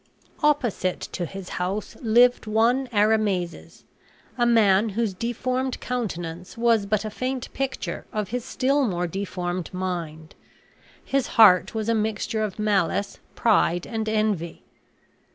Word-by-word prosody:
Opposite 255 - +1
to 175 - -3
his 195 0 -8
house 195 +4 -3
lived 240 +1 +4
one 235 +5 +2
Arimazes, 210 -5 0 0.5
a 240 -1 +2
man 220 -2 +4
whose 215 0 -1
deformed 250 +5 -2
countenance 180 -8 -4
was 230 -3 +2
but 215 +1 0
a 215 - -4
faint 255 +3 -4
picture 270 0 -4
of 210 -3 -3
his 245 0 -3
still 275 +3 +1
more 180 -3 -1
deformed 180 -1 -4
mind. 170 -4 -5 0.7
His 275 -2 0
heart 205 -2 +6
was 220 -1 -2
a 230 - +2
mixture 220 0 -1
of 210 -3 -3
malice, 200 -2 0 0.2
pride, 180 -6 +2
and 220 -1 -3
envy. 215 -6 -1
215 Hz, 130 wpm, -24 LUFS, 185-235 Hz, 0.7 s, heart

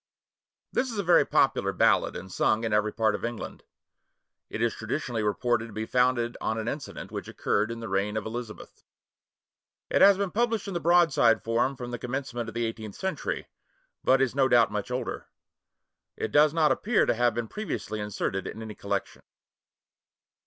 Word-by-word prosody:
[THIS 260 -1 0
is - - -6
a 200 - 0
very 175 -1 +5
popular - - +2
ballad, - - +2
and 95 - -8
sung 110 +4 +1
in 110 -2 -1
every 105 0 +2
part 110 -1 +1
of - - -5
England. 120 -1 -5 0.9
It - - -5
is 115 -1 +1
traditionally 115 0 -3
reported 115 +2 0
to 115 - -12
be 110 +1 -3
founded 125 -1 +1
on 110 - -1
an 110 0 -3
incident 140 +2 -5
which - - -5
occurred 105 +2 0
in 115 0 -6
the 115 - -5
reign 100 +2 -1
of 110 - -3
Elizabeth. 115 -1 -7 1.1
It - - +3
has 200 -1 +8
been 200 -2 -1
published 225 -2 0
in 195 - -4
the 175 - -1
broadside 165 -10 +4
form 120 +4 +1
from 120 -1 -7
the 120 - -4
commencement 120 -2 -4
of 115 - -11
the 120 0 0
eighteenth 110 -2 -6
century, 190 0 -3 0.6
but 130 +1 +4
is 125 -4 -1
no 135 -1 +3
doubt 120 -4 +4
much 105 +4 -3
older. 125 -1 -4 0.9
It 110 - -3
does 150 0 +5
not 155 -2 +3
appear 220 - +2
to - - +2
have 120 +1 +1
been 120 -1 -2
previously 110 - -4
inserted 95 -2 -3
in 110 - -7
any 110 -1 -7
collection. 100 -1 -4
120 Hz, 185 wpm, -27 LUFS, 110-135 Hz, 1.1 s, has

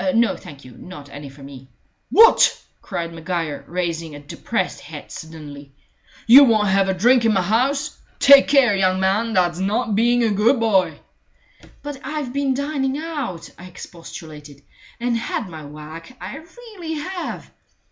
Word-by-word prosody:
No, 230 -3 +3
thank 140 -2 -13
you 130 - -12
not 145 -6 -11
any 145 0 -9
for 135 +1 -15
me." 135 -1 -12 0.4
"What!" 455 +1 +6 0.2
cried 170 0 -5
Maguire, 165 -2 -4
raising 170 -3 -3
a - - -9
depressed 145 0 -4
head - - -11
suddenly. 145 -3 -10 0.5
"You 260 +5 +9
won't 215 -5 +3
have 195 0 +2
a - - +2
drink 240 +6 +4
in 225 -1 +3
my 190 -2 +1
house? 270 +9 -1 0.2
Take 280 0 +7
care, 265 -7 +4
young 185 -1 +1
man. 205 +4 0
That's 175 -3 +1
not 210 +4 -1
being 240 +3 +2
a 225 - +2
good 225 +6 +2
boy!" 190 -9 +1 0.8
"But 290 -2 -6
I've 300 -5 -4
been 275 -1 0
dining 280 -1 -2
out," 290 - -5
I 175 - -11
expostulated, 155 -5 -11 0.4
"and 240 0 -1
had 230 -2 -3
my 160 -4 -10
whack. 155 - -11
I - - -7
really 345 0 -9
have." 355 +4 -6
200 Hz, 155 wpm, -21 LUFS, 165-265 Hz, 0.8 s, You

